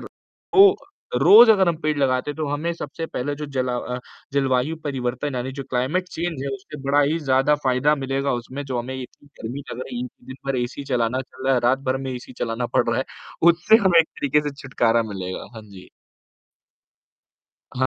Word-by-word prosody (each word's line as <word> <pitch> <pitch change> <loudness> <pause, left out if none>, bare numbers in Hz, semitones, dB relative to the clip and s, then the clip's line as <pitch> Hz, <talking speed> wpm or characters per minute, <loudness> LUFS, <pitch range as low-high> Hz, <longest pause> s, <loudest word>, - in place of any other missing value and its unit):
तो 395 0 +2 0.5
रोज़ 215 - +9
अगर 195 -4 +5
हम 170 - +1
पेड़ 155 -2 0
लगाते 130 0 +1
हैं, 145 - -8
तो 155 -1 -2
हमें 150 +4 -1
सबसे 165 +1 -6
पहले 145 -1 -3
जो 150 +1 -6
जला 125 -1 0
अ, 125 0 -4 0.3
जलवायु 135 +2 +1
परिवर्तन, 130 0 -3
यानी 125 +1 -3
जो 140 +1 -6
क्लाइमेट 135 +9 0
चेंज 170 -5 -4
है, 140 - -3
उससे 190 -7 -10
बड़ा 140 +1 +3
ही 150 +4 +1
ज़्यादा 135 -1 +2
फ़ायदा 130 +3 +3
मिलेगा। 135 0 -1
उसमें 135 +4 -7
जो 130 -3 -3
हमें 125 +2 -4
इतनी 130 +2 -10
गर्मी 120 +5 -5
लग 120 - -6
रही 125 -2 -5
है, 125 - -5 0.2
दिन 130 - -8
भर 135 -1 0
एसी 125 +3 -4
चलाना 120 +1 +1
चल 130 0 -13
रहा 135 - +4
है, 125 - +2
रात 130 +2 +3
भर 130 - +1
में - - -3
एसी 125 0 -8
चलाना 115 +1 -2
पड़ - - +3
रहा - - +1
है, - - 0 0.5
उससे 175 +6 +4
हमें 175 -3 +6
एक 160 - -1
तरीके 145 +1 0
से 145 - -7
छुटकारा 120 -4 +2
मिलेगा। 95 -1 -5
हाँ 110 - -9
जी। 100 -3 -14 1.9
हाँ। 130 0 +1
135 Hz, 200 wpm, -23 LUFS, 125-150 Hz, 1.9 s, रोज़